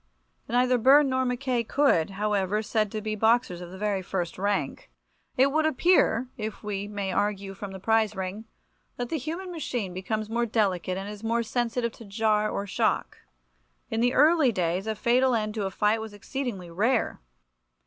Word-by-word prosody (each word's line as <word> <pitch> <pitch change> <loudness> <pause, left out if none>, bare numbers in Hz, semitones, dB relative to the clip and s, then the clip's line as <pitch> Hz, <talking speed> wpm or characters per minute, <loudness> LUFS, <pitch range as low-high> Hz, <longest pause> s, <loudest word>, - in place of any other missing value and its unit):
Neither 250 +1 +3
Byrne 275 +4 +6
nor 260 0 +1
Mackay 250 -1 0
could, 225 - +2
however, 205 -1 0
be 215 - -1
said 215 -1 0
to 215 - -3
be 215 0 -3
boxers 220 -4 +2
of 175 - -8
the 190 - -10
very 205 -1 -1
first 180 -2 -4
rank. 195 - -2 0.5
It 255 - +6
certainly 275 0 +2
would 310 0 +2
appear, 315 -5 +3
if 215 -1 -5
we 205 -1 -3
may 200 -2 -3
argue 200 0 -1
from 200 +1 -7
the 190 - -8
prize 220 +1 +2
ring, 190 +3 -5 0.5
that 245 -1 -3
the 320 - -1
human 335 +7 -5
machine 245 - -3
becomes 210 +4 -3
more 235 +2 0
delicate 190 -5 0
and 195 +1 -5
is 210 +1 -8
more 230 +1 +1
sensitive 235 0 -1
to 225 - -13
jar 215 +1 +1
or 200 - -3
shock. 195 - -1 0.7
In 225 - 0
the 245 +1 +2
early 305 -2 +5
days 180 0 -1
a 220 - -1
fatal 250 +3 +3
end 215 -1 -1
to 210 -3 -2
a - - -3
fight 210 +3 +1
was 220 -2 -8
exceedingly 205 -5 -5
rare. 225 +8 0
215 Hz, 190 wpm, -27 LUFS, 200-245 Hz, 0.7 s, Byrne